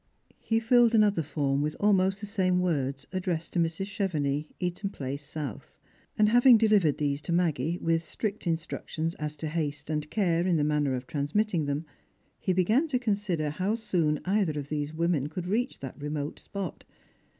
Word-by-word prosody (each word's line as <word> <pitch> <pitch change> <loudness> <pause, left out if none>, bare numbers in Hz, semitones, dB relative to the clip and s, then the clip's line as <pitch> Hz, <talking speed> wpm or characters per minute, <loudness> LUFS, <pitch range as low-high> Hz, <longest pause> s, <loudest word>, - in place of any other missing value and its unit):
He 225 0 +1
filled 235 0 +4
another 205 -5 +4
form 145 -2 0
with 150 +1 -1
almost 195 -1 +3
the - - -4
same 185 -3 +1
words 140 -6 -1
addressed 175 -3 -2
to - - +1
Mrs. 165 +3 0
Chevenix, 155 -8 -1
Eaton 180 +2 -2
place 140 -5 -5
south. 145 -5 -7 0.4
And 210 - +5
having 245 +1 +7
delivered 210 -9 +3
these 145 -1 -1
to 150 - -5
Maggie, 170 -2 +1
with 165 -1 0
strict 210 +1 -4
instructions 165 0 -2
as 150 0 -3
to 155 +2 -5
haste 150 -2 -3
and 150 -1 -2
care 175 -3 +1
in 175 -3 +3
the 150 - +1
manner 145 -3 +1
of 125 0 -5
transmitting 160 +5 0
them, 145 +3 -2 0.5
he 190 - 0
began 215 - +3
to 275 -5 +1
consider 200 -10 -1
how 185 +8 0 0.2
Boon 150 -5 +2
either 190 -5 +1
of 140 0 -7
these 150 -1 -2
women 160 -3 0
could 175 +3 -5
reach 235 +8 -1
that 135 +2 -8
remote 150 0 -3
spot. 195 -4 -6
165 Hz, 175 wpm, -28 LUFS, 150-200 Hz, 0.5 s, having